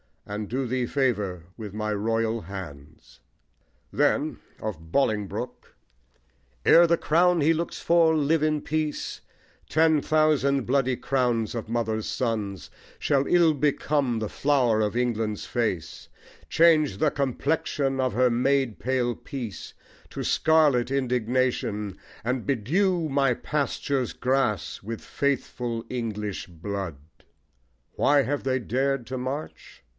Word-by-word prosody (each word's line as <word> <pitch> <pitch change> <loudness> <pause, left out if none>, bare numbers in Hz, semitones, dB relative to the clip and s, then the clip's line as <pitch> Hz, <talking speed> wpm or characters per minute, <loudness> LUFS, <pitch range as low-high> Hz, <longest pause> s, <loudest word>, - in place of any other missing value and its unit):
And 105 0 -5
do 130 +2 -1
thee 125 0 -1
favour 105 - -1
with 105 -4 -7
my 105 0 -2
royal 115 +2 0
hands. 80 -6 -10 0.7
Then - - +1 0.2
(of 80 -7 -6
Bolingbroke) 105 -6 -2 0.9
Ere 170 0 +7
the 170 0 +3
crown 175 +2 +3
he 160 +3 +4
looks 170 +1 -3
for 165 -1 +4
live 155 +1 +2
in 155 -1 +1
peace, 155 -1 -3 0.5
Ten 160 -1 +3
thousand 145 -4 +2
bloody 130 -1 +1
crowns 120 -4 0
of 115 -2 -5
mothers' 110 -2 -1
sons 110 -6 -3 0.3
Shall 140 -1 +1
ill 170 -3 +5
become 140 -3 0
the 110 -2 -3
flower 130 -6 +2
of 105 +1 0
England's 115 -4 -1
face; 110 -9 -3 0.4
Change 155 - +4
the 150 +4 +2
complexion 140 0 -1
of 130 -1 +1
her 125 +2 +3
maid 130 0 +1
pale 125 -1 0
peace 120 -7 -7 0.4
To - - -4
scarlet 150 -7 +3
indignation, 125 -6 -1 0.3
and 125 +1 -2
bedew 165 - +1
My 135 -2 +2
pastures' 140 -2 -2
grass 130 -6 0
with 115 +2 -6
faithful 125 -4 -2
English 105 -5 -4
blood. 95 0 -5 1.0
Why 145 -1 +3
have 145 +4 -2
they 130 0 +1
dared 130 +2 -1
to 130 +1 -4
march? 130 +4 -6
125 Hz, 120 wpm, -26 LUFS, 110-145 Hz, 1.0 s, Ere